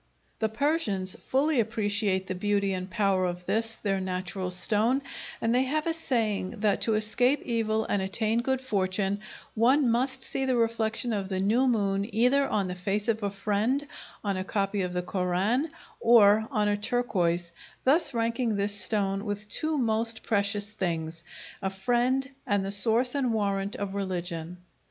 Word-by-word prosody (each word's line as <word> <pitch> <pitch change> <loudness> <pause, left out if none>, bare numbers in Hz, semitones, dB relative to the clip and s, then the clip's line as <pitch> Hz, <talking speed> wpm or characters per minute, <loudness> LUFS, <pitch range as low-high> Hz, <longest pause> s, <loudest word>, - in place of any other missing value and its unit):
The 220 - +1
Persians 220 - 0
fully 280 +1 +2
appreciate 205 -3 +1
the 185 - -3
beauty 200 +1 0
and 185 0 -4
power 195 -3 +1
of 180 0 -5
this, 225 +2 0
their 195 -2 -1
national 185 0 -3
stone, 220 +8 +2 0.4
and 225 +1 +1
they 250 - +4
have 305 +3 -1
a 330 - +1
saying 225 - -1
that 210 -2 +2
to 225 - +2
escape 245 +6 +2
evil 220 -2 0
and 205 - 0
attain 215 +4 0
good 265 +1 -1
fortune 200 -4 -1 0.3
one 250 +3 +3
must 260 +2 0
see 270 - -2
the 260 -1 +1
reflection 230 0 +1
of 195 -2 -2
the 190 -1 -2
new 225 +7 +2
moon 200 -3 +1
either 260 +5 +4
on 200 -3 0
the 180 - -3
face 195 +4 -2
of 225 0 +1
a 200 - 0
friend, 210 +8 0 0.4
on 200 -2 -1
a 185 - -2
copy 195 +1 -1
of 180 -1 -2
the 180 0 -1
Koran, 190 - 0 0.3
or 220 -2 +5
on 210 -5 +1
a 205 0 +1
turquoise, 180 -7 0 0.3
thus 310 +6 +4
ranking 230 -1 0
this 200 +1 +1
stone 200 0 0
with 205 -1 -4
two 310 +7 0
most 225 -2 0
precious 205 -1 0
things, 165 -4 -3 0.4
a 190 - -1
friend 245 +7 0 0.2
and 200 -1 +1
the 195 - -3
source 225 +5 +2
and 260 -5 0
warrant 200 -1 -1
of 200 -1 -4
religion. 180 -3 -4
210 Hz, 170 wpm, -28 LUFS, 195-235 Hz, 0.4 s, or